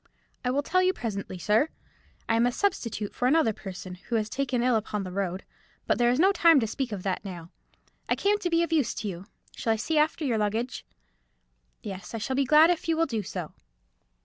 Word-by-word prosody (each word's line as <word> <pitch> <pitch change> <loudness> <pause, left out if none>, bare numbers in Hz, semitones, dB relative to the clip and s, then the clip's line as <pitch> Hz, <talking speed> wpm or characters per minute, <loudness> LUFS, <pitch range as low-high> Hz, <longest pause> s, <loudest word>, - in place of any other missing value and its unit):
"I 250 - 0
will 280 +3 +1
tell 370 +5 +2
you 370 0 +3
presently, 200 - -5
sir. 210 - +2 0.6
I 225 - +2
am 235 +2 +4
a - - +1
substitute 230 - -2
for 250 - 0
another 275 -5 +3
person, 185 -2 -8 0.2
who 235 - 0
was 215 -1 0
taken 255 -1 -1
ill 250 -1 +3
upon 210 -2 -2
the 185 - -6
road. 190 0 -2 0.4
But - - +1
there 240 0 +4
is 250 +3 +1
no 380 +4 +6
time 335 -6 +5
to 230 - 0
speak 250 +3 -3
of 195 -3 -5
that 190 -1 -2
now. 175 -4 -8 0.6
I - - +3
came 410 +1 +1
to 360 - -1
be 335 0 +3
of 335 - -2
use 295 -8 +1
to 215 - -4
you. 185 -1 -6 0.3
Shall 225 - 0
I - - 0
see 300 +8 0
after 310 +1 +1
your 235 -5 +1
luggage?" 220 +4 -2 1.0
"Yes, 195 -1 -7
I - - -1
shall 240 +4 -2
be 275 0 +2
glad 310 +5 +6
if 345 - -2
you 325 - +2
will 330 - +3
do 230 -8 -2
so." 180 -4 -6
235 Hz, 230 wpm, -27 LUFS, 205-300 Hz, 1.0 s, no